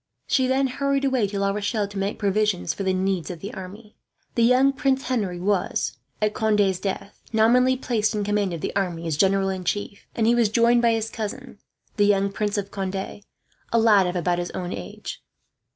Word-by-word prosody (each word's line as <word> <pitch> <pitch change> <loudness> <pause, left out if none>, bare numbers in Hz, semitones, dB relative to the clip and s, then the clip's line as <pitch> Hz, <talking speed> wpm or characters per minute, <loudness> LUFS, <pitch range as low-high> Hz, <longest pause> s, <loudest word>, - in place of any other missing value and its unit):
She 260 -1 +2
then 265 +1 +2
hurried 275 +1 0
away 260 -6 +2
to 200 +1 -5
La 200 0 +1
Rochelle, 205 +1 -1
to 200 0 -9
make 195 +1 -2
provision 205 -2 +1
for - - -3
the 190 -1 +1
needs 185 -3 -1
of 175 -3 -6
the 200 - -7
army. 205 +3 -10 0.4
The 235 - 0
young 255 +4 +5
Prince 270 0 +1
Henry 205 -9 -2
was, 180 -8 -1 0.2
at 210 0 +2
Conde's 205 -4 +2
death, 195 +1 -5
nominally 250 +4 +4
placed 220 -5 0
in 210 - -1
command 205 -2 0
of 165 -2 -5
the - - -4
army 175 -4 -1
as 160 -2 -1
general 195 +4 +2
in 190 -1 -3
chief; 200 +2 -3
and 225 - +1
he 235 - +4
was 235 -3 +3
joined 235 +2 +4
by 235 -1 +4
his 225 0 -2
cousin, 225 +1 -6 0.4
the 205 - +4
young 200 -1 +2
Prince 205 +1 -2
of 200 -1 -3
Conde, 195 -1 -3
a 200 +3 -6
lad 210 -4 +5
of 180 - -3
about 175 0 0
his 175 - -3
own 180 -1 -4
age. 90 -2 -7
205 Hz, 205 wpm, -24 LUFS, 190-230 Hz, 0.4 s, young